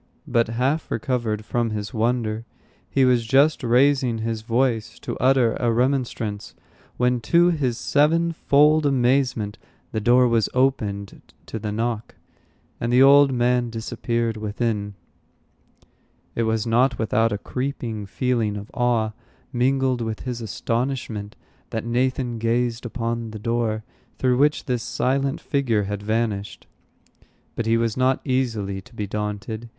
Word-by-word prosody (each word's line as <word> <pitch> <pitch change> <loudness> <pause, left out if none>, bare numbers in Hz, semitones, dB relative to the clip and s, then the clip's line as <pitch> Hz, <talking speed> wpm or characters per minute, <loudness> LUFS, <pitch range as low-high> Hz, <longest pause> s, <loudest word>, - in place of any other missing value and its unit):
But 115 -1 +2
half 130 +7 -1
recovered 115 -3 -2
from 120 0 0
his 105 -1 -4
wonder, 115 -1 0 0.5
he 135 -1 +3
was 125 -2 +3
just 140 +7 +3
raising 125 0 +3
his 110 0 -3
voice 115 0 0
to - - -5
utter 130 -2 +3
a 120 -1 +2
remonstrance, 120 -4 -1 0.4
when, 125 0 +2
to 175 +8 +4
his 130 -8 -1
sevenfold 155 0 +3
amazement, 125 -5 +1 0.3
the 110 - -2
door 125 +3 +5
was 115 -2 +2
opened 105 -7 0 0.2
to 110 - -6
the 105 0 -4
knock, 115 +1 -3 0.6
and 115 - -1
the 125 +2 +6
old 140 0 +7
man 125 -1 +1
disappeared 115 0 -2
within. 105 -1 -2 1.4
It 115 - 0
was 110 0 0
not 120 +3 +2
without 110 +1 +1
a 105 - -1
creeping 120 -3 -4
feeling 110 0 -1
of 100 +1 -9
awe, 120 -3 +1 0.4
mingled 130 0 +1
with 110 -1 -3
his 125 -2 -4
astonishment, 115 -1 -3 0.3
that 115 0 -4
Nathan 125 0 -1
gazed 120 +1 0
upon 115 -1 -3
the 110 - -7
door 115 -1 -1 0.3
through 125 -1 +2
which 150 +2 +2
this 125 -4 -1
silent 135 +4 -1
figure 125 -8 0
had 100 0 -4
vanished. 105 -1 -2 0.9
But 115 - -2
he 115 0 +3
was 115 -1 0
not 130 +1 +2
easily 115 -8 -1
to 115 - -19
be 105 - -3
daunted. 105 +2 -4
120 Hz, 135 wpm, -23 LUFS, 110-130 Hz, 1.4 s, old